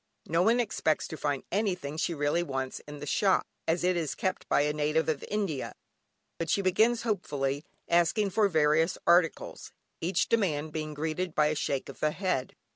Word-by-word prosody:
No 165 Hz, +2 st, +1 dB
one 230 Hz, +6 st, +4 dB
expects 205 Hz, -9 st, 0 dB
to -, -, -5 dB
find 145 Hz, -3 st, -2 dB
anything 180 Hz, -8 st, -1 dB
she 165 Hz, +1 st, -1 dB
really 145 Hz, +3 st, +1 dB
wants 135 Hz, -5 st, -3 dB
in 150 Hz, 0 st, -8 dB
the 145 Hz, -, -7 dB
shop, 190 Hz, +6 st, +2 dB, 0.2 s
as 165 Hz, +2 st, +1 dB
it 180 Hz, 0 st, +2 dB
is 155 Hz, -7 st, -2 dB
kept 185 Hz, 0 st, -3 dB
by -, -, +4 dB
a 150 Hz, +1 st, +1 dB
native 150 Hz, +2 st, +1 dB
of 155 Hz, -3 st, -1 dB
India, 195 Hz, -10 st, -2 dB, 0.7 s
but 165 Hz, -1 st, -2 dB
she 200 Hz, -, +2 dB
begins 220 Hz, +6 st, +3 dB
hopefully 145 Hz, -, -1 dB, 0.2 s
asking 175 Hz, +4 st, +2 dB
for 210 Hz, +2 st, +3 dB
various 160 Hz, 0 st, +2 dB
articles, 170 Hz, -2 st, +2 dB, 0.3 s
each 180 Hz, +4 st, 0 dB
demand 155 Hz, -9 st, 0 dB
being 155 Hz, -1 st, -4 dB
greeted 160 Hz, +3 st, -2 dB
by 150 Hz, 0 st, +4 dB
a 155 Hz, -, -1 dB
shake 140 Hz, -2 st, -2 dB
of -, -, -10 dB
the 155 Hz, -, +2 dB
head. 180 Hz, -6 st, -2 dB
160 Hz, 185 wpm, -29 LUFS, 150-185 Hz, 0.7 s, one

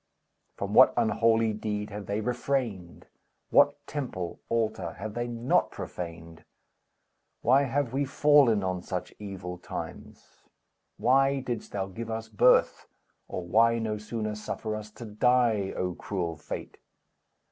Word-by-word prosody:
From -, -, -3 dB
what -, -, +7 dB
unholy 115 Hz, 0 st, +3 dB
deed 105 Hz, -1 st, -3 dB
have 105 Hz, 0 st, -7 dB
they 100 Hz, +2 st, -1 dB
refrained? 120 Hz, -6 st, -2 dB, 0.5 s
What -, -, +4 dB
temple, 120 Hz, -, -4 dB
altar, 110 Hz, -7 st, -1 dB
have 105 Hz, +3 st, -6 dB
they 120 Hz, +1 st, -2 dB
not 120 Hz, +1 st, +1 dB
profaned? 85 Hz, -1 st, -8 dB, 1.0 s
Why 135 Hz, +4 st, +4 dB
have 135 Hz, -1 st, -1 dB
we 140 Hz, +1 st, +1 dB
fallen 140 Hz, -7 st, +4 dB
on 95 Hz, -1 st, -2 dB
such -, -, -5 dB
evil 95 Hz, -3 st, -7 dB
times? -, -, -9 dB, 0.5 s
Why 135 Hz, +1 st, +3 dB
didst 120 Hz, -4 st, -5 dB
thou 95 Hz, -1 st, -1 dB
give 110 Hz, +4 st, -7 dB
us 110 Hz, 0 st, -4 dB
birth, 105 Hz, -, +3 dB, 0.4 s
or 90 Hz, -, -5 dB
why 115 Hz, +6 st, +4 dB
No 110 Hz, -2 st, -2 dB
sooner 110 Hz, 0 st, -3 dB
suffer 105 Hz, +1 st, -4 dB
us 105 Hz, 0 st, -7 dB
to 120 Hz, -, -9 dB
die, 110 Hz, -2 st, +2 dB
O 90 Hz, -1 st, -1 dB
cruel 85 Hz, -3 st, -3 dB
Fate? 75 Hz, -, -7 dB
110 Hz, 135 wpm, -28 LUFS, 95-120 Hz, 1.0 s, what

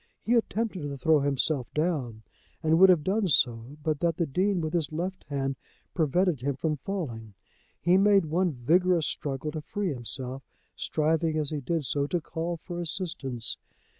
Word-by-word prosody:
He 235 Hz, -, 0 dB
attempted 225 Hz, -4 st, 0 dB
to 145 Hz, -1 st, -4 dB
throw 155 Hz, +3 st, +4 dB
himself 140 Hz, -1 st, 0 dB
down, 140 Hz, -9 st, -1 dB, 0.4 s
and 160 Hz, +1 st, +4 dB
would 190 Hz, 0 st, +9 dB
have 175 Hz, -5 st, +5 dB
done 195 Hz, +4 st, +1 dB
so 125 Hz, -2 st, +1 dB
but 155 Hz, -2 st, 0 dB
that 170 Hz, 0 st, +1 dB
the 170 Hz, -, +1 dB
Dean 185 Hz, +6 st, +1 dB
with 155 Hz, -1 st, -3 dB
his 160 Hz, -5 st, 0 dB
left 180 Hz, +4 st, -4 dB
hand 135 Hz, -2 st, -2 dB, 0.4 s
prevented 170 Hz, -1 st, +1 dB
him 140 Hz, +1 st, -1 dB
from 155 Hz, +2 st, -1 dB
falling. 125 Hz, -, -5 dB, 0.4 s
He 175 Hz, +4 st, +4 dB
made 200 Hz, -2 st, +5 dB
one 175 Hz, +3 st, +1 dB
vigorous 165 Hz, +6 st, +2 dB
struggle 145 Hz, +1 st, -3 dB
to 155 Hz, 0 st, -4 dB
free 190 Hz, +2 st, -2 dB
himself, 130 Hz, +1 st, -4 dB, 0.3 s
striving 160 Hz, +1 st, 0 dB
as 150 Hz, -1 st, 0 dB
he 150 Hz, -2 st, -2 dB
did 155 Hz, +3 st, -1 dB
so 140 Hz, +3 st, 0 dB
to 175 Hz, -, 0 dB
call 165 Hz, +2 st, -4 dB
for 175 Hz, +2 st, -6 dB
assistance. 150 Hz, -, -3 dB
155 Hz, 170 wpm, -28 LUFS, 140-175 Hz, 0.4 s, would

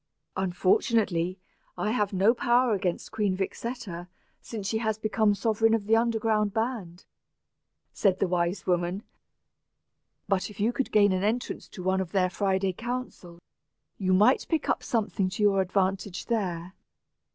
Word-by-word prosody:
"Unfortunately, 185 Hz, 0 st, +1 dB, 0.4 s
I 210 Hz, -, 0 dB
have 210 Hz, -4 st, 0 dB
no 200 Hz, +4 st, +4 dB
power 240 Hz, 0 st, +2 dB
against 185 Hz, -3 st, -2 dB
Queen 205 Hz, -4 st, 0 dB
Vixetta 195 Hz, -3 st, -5 dB, 0.3 s
since 215 Hz, -4 st, -7 dB
she 220 Hz, +2 st, 0 dB
has 220 Hz, -2 st, -1 dB
become 215 Hz, 0 st, +1 dB
the 205 Hz, -, +3 dB
sovereign 225 Hz, +1 st, +2 dB
of 215 Hz, -3 st, -3 dB
the 220 Hz, +2 st, +4 dB
underground 225 Hz, -3 st, +1 dB
band," 220 Hz, -7 st, -3 dB, 0.9 s
said 190 Hz, -3 st, +2 dB
the 195 Hz, -, +1 dB
wise 175 Hz, +1 st, -1 dB
woman. 180 Hz, +3 st, 0 dB, 1.2 s
"But, 195 Hz, 0 st, 0 dB
if 210 Hz, -, -13 dB
you 220 Hz, +4 st, +1 dB
could 270 Hz, -, -2 dB
gain 205 Hz, -2 st, +5 dB
an 185 Hz, 0 st, 0 dB
entrance 225 Hz, +4 st, -2 dB
to 185 Hz, -, -9 dB
one 190 Hz, +1 st, +1 dB
of 185 Hz, -1 st, -6 dB
their 185 Hz, -2 st, +2 dB
Friday 190 Hz, 0 st, 0 dB
councils, 225 Hz, -6 st, -6 dB, 0.6 s
you 185 Hz, -2 st, 0 dB
might 210 Hz, +8 st, +4 dB
pick 320 Hz, -3 st, 0 dB
up -, -, +1 dB
something 205 Hz, -4 st, -1 dB
to 200 Hz, +3 st, -3 dB
your 195 Hz, -2 st, +4 dB
advantage 190 Hz, 0 st, -1 dB
there." 185 Hz, -6 st, -2 dB
200 Hz, 150 wpm, -27 LUFS, 185-225 Hz, 1.2 s, gain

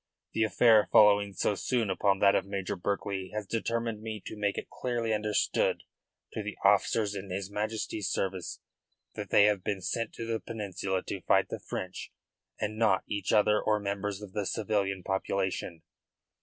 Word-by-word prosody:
The 110 Hz, -, +2 dB
affair 110 Hz, 0 st, +5 dB
following 100 Hz, -1 st, +6 dB
so 105 Hz, -, +1 dB
soon 115 Hz, 0 st, 0 dB
upon 100 Hz, +1 st, +2 dB
that 100 Hz, -1 st, +6 dB
of -, -, +2 dB
Major 100 Hz, -1 st, -3 dB
Berkeley 100 Hz, 0 st, -3 dB
has 105 Hz, -1 st, -2 dB
determined 115 Hz, +1 st, -2 dB
me 110 Hz, -1 st, -5 dB
to -, -, -6 dB
make 105 Hz, -1 st, -1 dB
it -, -, -4 dB
clearly 120 Hz, -3 st, -2 dB
understood 105 Hz, -1 st, +1 dB, 0.5 s
to -, -, -3 dB
the -, -, -6 dB
officers 105 Hz, -3 st, +3 dB
in 100 Hz, -1 st, -6 dB
his 95 Hz, +2 st, -4 dB
Majesty's 105 Hz, -1 st, -2 dB
service 95 Hz, -2 st, -3 dB, 0.5 s
that -, -, -6 dB
they 100 Hz, -, +6 dB
have 105 Hz, -3 st, +3 dB
been 100 Hz, -2 st, -1 dB
sent 115 Hz, +5 st, -2 dB
to 115 Hz, -, -6 dB
the 115 Hz, 0 st, -1 dB
Peninsula 100 Hz, -4 st, -3 dB
to -, -, -5 dB
fight -, -, +3 dB
the -, -, -4 dB
French 95 Hz, 0 st, -6 dB, 0.5 s
and 110 Hz, +1 st, -3 dB
not 110 Hz, -5 st, +3 dB
each 100 Hz, -3 st, -2 dB
other 105 Hz, 0 st, +4 dB
or 105 Hz, -1 st, +2 dB
members 100 Hz, 0 st, -3 dB
of 95 Hz, -2 st, -10 dB
the 105 Hz, -2 st, -2 dB
civilian 100 Hz, -4 st, -1 dB
population. 95 Hz, -3 st, -2 dB
105 Hz, 170 wpm, -30 LUFS, 95-110 Hz, 0.5 s, following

